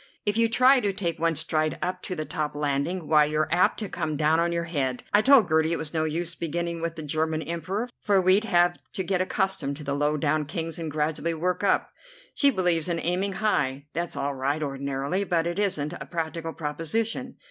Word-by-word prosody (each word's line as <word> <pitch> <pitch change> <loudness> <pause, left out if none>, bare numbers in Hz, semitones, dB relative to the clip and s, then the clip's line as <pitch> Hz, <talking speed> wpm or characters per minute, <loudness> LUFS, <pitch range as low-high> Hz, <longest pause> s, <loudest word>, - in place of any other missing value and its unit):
If 205 0 +1
you 230 0 +3
try 255 +3 +5
to 205 -4 0
take 170 -4 -3
one 165 0 +1
stride 155 0 0
up 180 +2 -3
to 185 - -4
the 155 -2 -4
top 150 -1 -3
landing, 150 +4 -1
why 150 -1 +5
you're 155 +1 0
apt 180 +2 +3
to 210 - -3
come 155 -5 -3
down 155 +2 +3
on 170 0 +1
your 170 0 -1
head. 140 -7 -2
I 205 - +6
told 255 -4 +6
Gertie 160 +1 +2
it - - 0
was 160 -1 -5
no 160 -1 +1
use 170 +2 -1
beginning 170 +1 -3
with 165 0 -3
the 160 - -6
German 155 +1 -1
Emperor, 170 +8 -3
for 200 -2 +2
we'd 190 +4 +4
have 175 -3 +3
to 190 - -2
get 185 0 0
accustomed 185 -7 -1
to 150 - -8
the 140 -1 -2
low 145 +1 +1
down 150 +1 0
Kings 165 +1 -4
and 165 -1 -4
gradually 155 +2 -1
work 180 +4 -1
up. 200 - +2 0.4
She 280 - +4
believes 180 - +2
in 170 -1 -1
aiming 185 +4 -1
high. 145 -10 0
That's 170 +1 -3
all 140 +1 -2
right 140 +3 -1
ordinarily, 140 +5 -2
but 170 -4 0
it 175 +3 -2
isn't 165 -7 0
a - - -8
practical 165 -1 -4
proposition. 215 - -2
165 Hz, 215 wpm, -26 LUFS, 155-185 Hz, 0.4 s, I